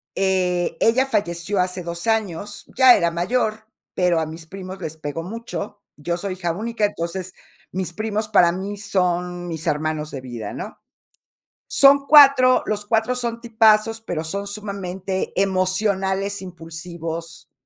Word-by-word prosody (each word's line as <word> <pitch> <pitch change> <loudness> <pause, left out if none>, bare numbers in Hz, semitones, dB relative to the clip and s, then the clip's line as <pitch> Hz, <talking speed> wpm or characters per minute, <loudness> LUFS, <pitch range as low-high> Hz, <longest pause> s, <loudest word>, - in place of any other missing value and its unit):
eh, 180 -3 0
ella 260 +4 +3
falleció 185 -4 -1
hace 180 0 -1
2 170 +3 -5
años, 205 -2 -2
ya 260 -2 +8
era 170 -3 +2
mayor, 215 +5 -1 0.3
pero 180 -2 +2
a 160 - -2
mis 160 +1 -9
primos 190 +2 -8
les 160 - -6
pegó 155 +1 -5
mucho. 210 0 -6 0.2
Yo 170 +4 -2
soy 190 +1 -3
hija 175 -2 -2
única, 220 +2 -1
entonces, 185 -1 -4 0.4
mis 185 -2 -3
primos 215 +1 -2
para 175 -5 +5
mí 195 +3 -5
son 180 -3 -1
mis 165 -2 -5
hermanos 155 0 -1
de 135 - -6
vida, 120 -5 -6
¿no? - - -7 0.9
Son 280 0 +5
4, 275 -4 +7
los 210 -1 -2
4 225 +3 +1
son 235 -1 -3
tipazos, 225 -1 +3
pero 175 -8 -4
son 200 +5 -4
sumamente 195 -2 -4
emocionales, 195 +1 0
impulsivos. 165 -1 -7
190 Hz, 145 wpm, -22 LUFS, 170-215 Hz, 0.9 s, ya